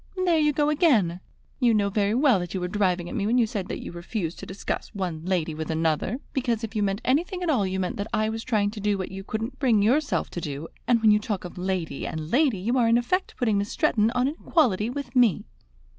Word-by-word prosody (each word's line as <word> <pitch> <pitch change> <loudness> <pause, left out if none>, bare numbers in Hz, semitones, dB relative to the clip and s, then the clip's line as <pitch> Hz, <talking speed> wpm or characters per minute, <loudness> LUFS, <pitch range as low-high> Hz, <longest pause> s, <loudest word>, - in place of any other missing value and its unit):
"There 335 -3 +3
you 300 -1 +3
go 295 +1 +1
again! 230 - +3 0.4
You 240 -4 +4
know 200 -1 +2
very 205 +1 +1
well 255 -6 +4
that 175 +1 -5
you - - -1
were 180 - -2
driving 180 -3 0
at - - -7
me 205 -4 -1
when 240 +3 +2
you 240 - +4
said 200 -4 -4
that - - -5
you - - -7
refused 175 0 -4
to - - -8
discuss 190 +1 -4
one 175 -5 -3
lady 175 -4 0
with 155 0 -5
another; 160 +7 0 0.2
because, 240 -4 -1
if 225 0 -5
you 210 - +1
meant 200 0 0
anything 355 +8 0
at 340 - +1
all, 210 -9 +2
you 190 0 -2
meant 180 -1 -2
that 200 +1 -3
I 215 0 +1
was 225 +1 -3
trying 210 -4 +1
to 215 - -8
do 205 0 0
what 185 -1 -5
you 195 0 -7
couldn't 225 +6 -4
bring 230 -7 +3
yourself 280 +7 +1
to 175 - -5
do; 150 +1 -5 0.2
and 235 -2 +3
when 215 - +7
you 210 - +4
talk 210 -3 -4
of 175 - -8
'lady' 180 -5 -3
and 155 0 -5
'lady' 265 -4 +3
you 235 +8 0
are 235 - +3
in 230 +1 +5
effect 365 +11 -1
putting 220 -5 +1
Miss 200 +1 -2
Stretton 215 0 +2
on 250 +1 +2
an 300 +4 -4
equality 230 - +2
with 280 +2 -6
me." 240 -8 +3
210 Hz, 255 wpm, -25 LUFS, 185-250 Hz, 0.4 s, when